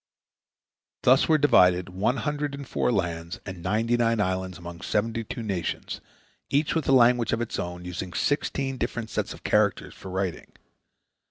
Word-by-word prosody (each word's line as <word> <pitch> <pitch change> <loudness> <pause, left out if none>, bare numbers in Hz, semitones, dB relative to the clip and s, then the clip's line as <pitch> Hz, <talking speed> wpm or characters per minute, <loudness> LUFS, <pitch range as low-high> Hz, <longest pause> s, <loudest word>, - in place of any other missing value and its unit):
" - - -67
Thus 130 +5 +5
were 155 - +6
divided 90 - +4
one 100 +8 0
hundred 145 +3 -2
and 140 -1 -8
four - - 0
lands 85 -5 -2
and 95 -2 -7
ninety 110 +6 +1
nine 115 -1 +2
islands 95 -2 -1
among 85 0 -9
seventy 115 +2 -1
two 115 +2 -6
nations, 95 -5 -3 0.5
each 145 +2 +1
with 160 -5 -1
a - - +5
language 120 -2 +5
of 115 - +1
its 120 - -3
own, 90 0 -5
using 90 0 -5
sixteen 135 - -1
different 115 -3 -3
sets - - -2
of - - -10
characters - - +1
for 95 - -10
writing. 95 -1 -3
110 Hz, 170 wpm, -26 LUFS, 90-125 Hz, 0.5 s, were